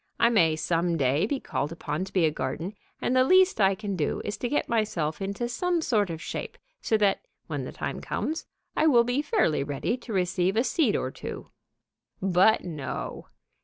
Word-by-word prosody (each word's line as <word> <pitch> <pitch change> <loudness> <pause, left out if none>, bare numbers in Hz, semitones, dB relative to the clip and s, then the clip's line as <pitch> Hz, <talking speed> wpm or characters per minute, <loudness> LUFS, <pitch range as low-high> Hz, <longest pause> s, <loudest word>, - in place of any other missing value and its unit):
I 235 - +5
may 165 -8 +4
some 170 +2 0
day 140 +6 +2
be 275 +3 -1
called 150 - -3
upon 165 +1 -3
to 190 - -11
be 180 -4 +3
a 155 - +2
garden, 150 +7 -4 0.3
and 255 - +1
the 255 - +6
least 370 - +4
I 195 0 +4
can 205 -1 -4
do 155 -5 -1
is 205 - -2
to 245 - -2
get 290 - 0
myself 200 -8 -1
into 200 +5 -2
some 350 +8 0
sort 215 - +1
of 165 -1 -4
shape, - - -5 0.2
so 220 - +2
that, 205 -2 +2 0.3
when - - -4
the - - -6
time - - -4
comes, 320 +2 -3 0.3
I 315 - +3
will 240 -6 +6
be 245 +4 0
fairly 165 - +1
ready 145 - -2
to 235 - -10
receive 185 0 +1
a 230 - +4
seed 265 -5 +2
or 130 - -1
two." - - -8 0.7
But 190 +3 +4
no! 155 -6 -5
195 Hz, 200 wpm, -27 LUFS, 165-240 Hz, 0.7 s, the